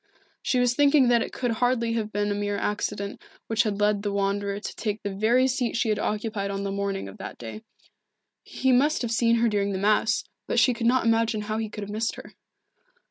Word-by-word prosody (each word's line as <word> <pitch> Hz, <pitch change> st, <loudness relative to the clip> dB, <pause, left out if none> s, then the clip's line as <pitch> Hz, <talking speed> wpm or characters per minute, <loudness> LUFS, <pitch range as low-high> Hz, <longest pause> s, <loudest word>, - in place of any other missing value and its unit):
She 255 Hz, -, 0 dB
was 245 Hz, -1 st, +3 dB
thinking 280 Hz, -1 st, +4 dB
that 235 Hz, -1 st, +4 dB
it -, -, -3 dB
could 245 Hz, -2 st, -2 dB
hardly 235 Hz, 0 st, +1 dB
have 220 Hz, -2 st, -2 dB
been 205 Hz, 0 st, -1 dB
a -, -, +1 dB
mere 205 Hz, 0 st, -2 dB
accident 205 Hz, 0 st, -3 dB, 0.2 s
which 225 Hz, -1 st, +1 dB
had 210 Hz, -3 st, -1 dB
led 205 Hz, -1 st, +2 dB
the 205 Hz, 0 st, -2 dB
Wanderer 200 Hz, 0 st, -1 dB
to -, -, -7 dB
take 215 Hz, -1 st, -3 dB
the 200 Hz, -, -3 dB
very 235 Hz, +6 st, +3 dB
seat 250 Hz, -2 st, -1 dB
she 230 Hz, -1 st, +1 dB
had 210 Hz, -1 st, +1 dB
occupied 210 Hz, -1 st, -2 dB
on 200 Hz, 0 st, -3 dB
the 200 Hz, -, -2 dB
morning 200 Hz, -, -2 dB
of 95 Hz, -, -11 dB
that -, -, -7 dB
day. 120 Hz, -, -8 dB, 0.8 s
He 265 Hz, -, 0 dB
must 275 Hz, +3 st, +3 dB
have 235 Hz, -, -2 dB
seen 230 Hz, 0 st, +3 dB
her 235 Hz, 0 st, +3 dB
during 200 Hz, -2 st, 0 dB
the -, -, -1 dB
Mass, 215 Hz, +3 st, +2 dB, 0.2 s
but -, -, -1 dB
she 245 Hz, +1 st, +5 dB
could 230 Hz, 0 st, -1 dB
not 250 Hz, 0 st, +3 dB
imagine 225 Hz, -1 st, +2 dB
how 215 Hz, +1 st, -3 dB
he 220 Hz, -1 st, -3 dB
could 210 Hz, 0 st, -6 dB
have 200 Hz, -, -7 dB
missed 220 Hz, +2 st, -1 dB
her. -, -, -11 dB
215 Hz, 230 wpm, -26 LUFS, 205-235 Hz, 0.8 s, she